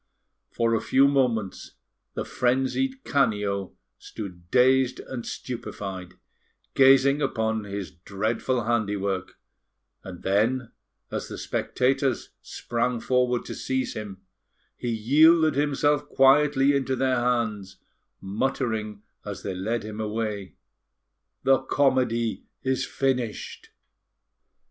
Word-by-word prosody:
For 115 0 0
a 115 - +1
few 135 +1 +4
moments, 120 -8 0 0.4
the - - -3
frenzied 135 - 0
Canio 105 -8 0 0.2
stood 90 -5 -9
dazed 130 +1 +3
and 125 -3 -6
stupefied, 95 -7 -6 0.6
gazing 135 +1 +5
upon 110 -5 -1
his 100 -1 -5
dreadful 110 +7 -2
handiwork; 100 -4 -1 0.7
and 90 -2 -9
then, 115 +6 +1 0.4
as - - -3
the - - -7
spectators 135 0 0
sprang 120 0 -2
forward 125 0 +1
to - - -6
seize 130 0 -2
him, 100 -3 -8 0.5
he 120 - -4
yielded 155 +8 +5
himself 145 +1 +1
quietly 140 0 +4
into 135 -1 0
their 130 0 +1
hands, 115 -6 -1 0.4
muttering 110 0 -2 0.2
as 105 -1 -7
they 100 - -3
led 105 +6 -2
him 105 0 -7
away: 105 -2 -3 0.9
"The 135 -1 +4
comedy 130 -4 +1 0.2
is 130 -1 0
finished!" 125 -5 -2
120 Hz, 105 wpm, -25 LUFS, 105-135 Hz, 0.9 s, gazing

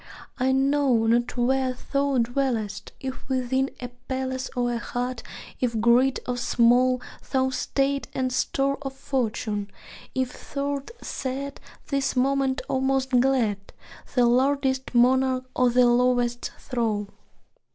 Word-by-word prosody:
I 260 +1 +2
know 270 -3 +3
not 240 +2 +1
where 255 +1 +1 0.2
thou 280 -1 +2
dwellest: 235 -4 -1
if 265 0 -7
within 260 +1 0
A 245 - -5 0.2
palace 260 0 -2
or 245 -1 0
a 235 - -2
hut; 245 0 -3 0.4
if 235 -3 0
great 245 +4 +4
or 250 0 -1
small 245 +1 +3 0.3
Thy 260 -1 +2
state 275 +1 -1
and 255 -1 -1
store 275 +1 0
of 270 -1 -5
fortune; 220 -6 -2 0.5
if 260 +2 -4
thou 280 0 0
'rt 275 - -10 0.2
sad 275 +1 -4 0.3
This 275 -2 0
moment, 270 +1 +1
or 260 - 0
most 265 0 +1
glad; 245 -6 +2 0.6
The 245 -2 +5
lordliest 265 +1 +1
monarch 255 +1 +3
or 250 -1 +4
the 250 +1 +4
lowest 245 0 +2
thrall. 220 -6 -2
255 Hz, 130 wpm, -25 LUFS, 245-270 Hz, 0.6 s, The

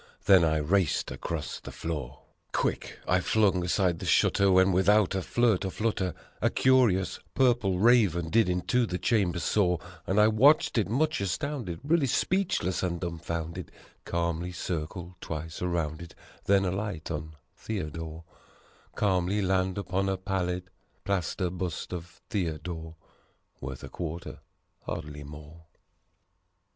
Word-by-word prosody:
Then 95 -3 +7
I 80 -1 +2
raced 85 +3 +1
across 80 -3 -4
the - - -9
floor: 75 -6 -5 0.3
Quick - - -1
I 90 - +3
flung 95 -2 +2
aside 90 -1 +1
the - - -5
shutter, 100 -1 +4
when, 95 +1 +5
without 100 +2 +4
a 95 - 0
flirt 115 0 +2
or 95 - -1
flutter, 100 -3 -1 0.3
A - - +3
curious 120 -9 +3 0.2
Purple 120 -8 +3
Raven 95 -7 +4
did 115 -4 +4
into 115 +7 +1
the 90 - -2
chamber 95 -5 +1
soar: 90 +1 +1 0.3
And 95 +3 +2
I 105 - +7
watched 120 +3 +4
it 100 - 0
much 150 +3 +1
astounded, 100 - -3
really 155 -1 +2
speechless 170 - 0
and 85 -2 -1
dumbfounded, 85 -1 -4 0.3
Calmly 85 +1 -2
circle 85 +1 -5
twice 80 0 -6
around 85 -3 -1
it, 85 - -10 0.3
then 100 -1 +4
alight 90 -3 -3
on 80 0 -5 0.2
Theo 95 -9 -4
dore 80 +1 -7 0.7
Calmly 95 0 +1
land 95 0 +1
upon 95 0 -1
a 95 - 0
pallid, 90 -1 -2 0.3
plaster 90 -1 -1
bust 90 -1 -4
of 90 0 -8
Theodore. 80 -3 -3 0.6
(Worth 65 0 -7
a - - -7
quarter 85 0 -6 0.4
hardly 75 -1 -6
more.) 75 +3 -12
90 Hz, 135 wpm, -28 LUFS, 85-100 Hz, 0.7 s, Then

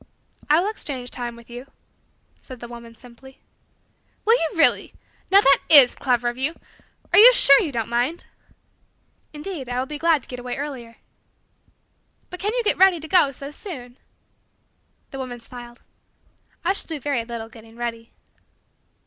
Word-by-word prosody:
"I 305 +2 +5
will 370 - -1
exchange 260 - -6
time 240 -1 -6
with 235 0 -16
you," 245 +2 -10 0.7
said 255 -2 -12
the 240 - -9
woman 235 -1 -12
simply. 250 +3 -17 0.9
"Will 450 - +5
you 330 -9 +1
really? 325 - +2 0.3
Now, 395 +1 +6
that 275 -7 +4
is 280 -6 +8
clever 245 -2 -1
of 240 +1 -4
you! 300 +5 -1 0.6
Are - - +7
you 475 +4 +10
sure 280 - +7
that - - -1
you - - -6
don't 230 -4 -3
mind?" 245 +8 -2 1.1
"Indeed, 300 -4 -7
I 245 - -3
will 255 - -1
be 295 +2 -8
glad 325 -4 +2
to - - -8
get 250 - -8
away 245 0 -5
earlier." 260 -5 -7 1.4
"But 360 - -8
can 410 +3 -2
you - - 0
get 420 - +1
ready 380 -2 +5
to 315 - -9
go 350 -5 +4
so 275 +2 -9
soon?" 265 - -10 1.1
The 270 - -8
woman 250 -2 -7
smiled. 240 0 -13 0.8
"I 375 - +2
shall - - -2
do 320 -3 -5
very 275 -4 -2
little 230 -1 -7
getting 225 0 -16
ready." 230 -1 -6
260 Hz, 170 wpm, -22 LUFS, 240-320 Hz, 1.4 s, you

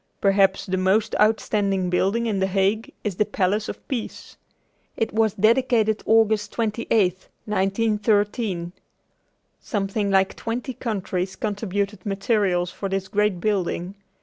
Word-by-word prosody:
Perhaps 195 -1 +3
the 185 -1 -1
most 195 +4 +2
outstanding 200 -3 +1
building 195 +6 +1
in 210 -4 0
The 190 - +1
Hague 195 +4 0
is 200 -4 -3
the - - +4
Palace 205 0 -1
of - - -8
Peace. 245 -5 -5 0.6
It 225 - -1
was 220 -2 +2
dedicated 220 0 +2
August 220 -2 +3
28, 230 0 -2 0.6
1913. 205 -2 0 0.9
Something 200 0 -2
like 190 -1 +2
twenty 240 +3 -4
countries 190 -5 -3
contributed 205 -2 -3
materials 195 -4 0
for 195 +2 -5
this 195 0 -2
great 210 -2 +1
building. 185 -2 -1
205 Hz, 120 wpm, -23 LUFS, 190-220 Hz, 0.9 s, the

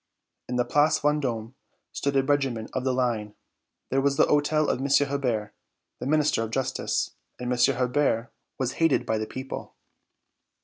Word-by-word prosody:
In 125 - -2
the 125 0 +2
Place 145 +5 +3
Vendôme 130 -6 -1 0.4
stood 140 0 -2
a 135 - +4
regiment 135 -5 0
of 130 - -2
the 130 - +1
Line. 120 -5 -1 0.6
There 135 +1 +2
was 140 0 +1
the - - +6
hôtel 150 +1 +2
of - - 0
M. 135 - -1 0.2
Hebert, 120 -7 -1 0.5
the - - -4
Minister 150 -4 +2
of 115 - -2
Justice, 130 +3 -1 0.3
and 125 0 -1
M. 125 +2 +3
Hebert 125 -2 0 0.2
was 130 -1 -1
hated 165 -3 +3
by 110 -1 0
the 110 - -3
people. 130 +1 -7
130 Hz, 165 wpm, -26 LUFS, 120-140 Hz, 0.6 s, the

